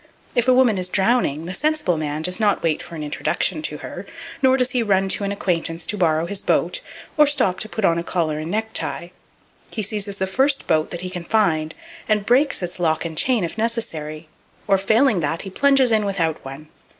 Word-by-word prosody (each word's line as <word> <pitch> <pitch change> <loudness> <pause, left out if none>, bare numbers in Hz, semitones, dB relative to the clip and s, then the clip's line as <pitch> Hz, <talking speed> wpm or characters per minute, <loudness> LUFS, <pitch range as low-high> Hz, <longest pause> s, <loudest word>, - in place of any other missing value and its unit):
If 240 -1 +1
a 255 - +6
woman 240 -6 +4
is 180 0 -2
drowning, 190 - +1
the 180 - -4
sensible 300 - 0
man 155 0 -3
does 180 +4 0
not 210 -2 +1
wait 160 -2 0
for 170 - -9
an 155 - -5
introduction 155 +2 -1
to 150 -1 -3
her; 180 - -8 0.3
nor 260 -1 +4
does 250 -1 +1
he 250 - +1
run 195 -3 +1
to 200 - -1
an 200 - -1
acquaintance 165 -4 -1
to 210 - -2
borrow 165 -4 +1
his 200 +3 -1
boat, - - 0 0.4
or 300 -1 +6
stop 195 -10 +1
to 215 - -4
put 220 -2 -1
on 170 -1 +3
a - - -4
collar 160 -4 -1
and 155 +1 -5
necktie. 215 -4 -2 0.6
He 215 - -3
seizes 200 0 -2
the 190 - 0
first 265 +8 +1
boat 155 -1 +1
that 175 - -5
he 185 0 -5
can 180 -2 -6
find, 165 -7 +1 0.3
and 210 -2 +2
breaks 255 -2 +3
its 180 +1 -4
lock 160 -1 0
and 160 -1 -5
chain 240 +4 +2
if 170 +6 -4
necessary; 165 -10 -3 0.4
or, 195 -2 +3
failing 220 +2 +3
that, 160 +1 -2
he 195 - -7
plunges 270 +1 +4
in 215 -1 +3
without 180 -6 -1
one. 135 +3 -9
190 Hz, 215 wpm, -21 LUFS, 165-225 Hz, 0.6 s, a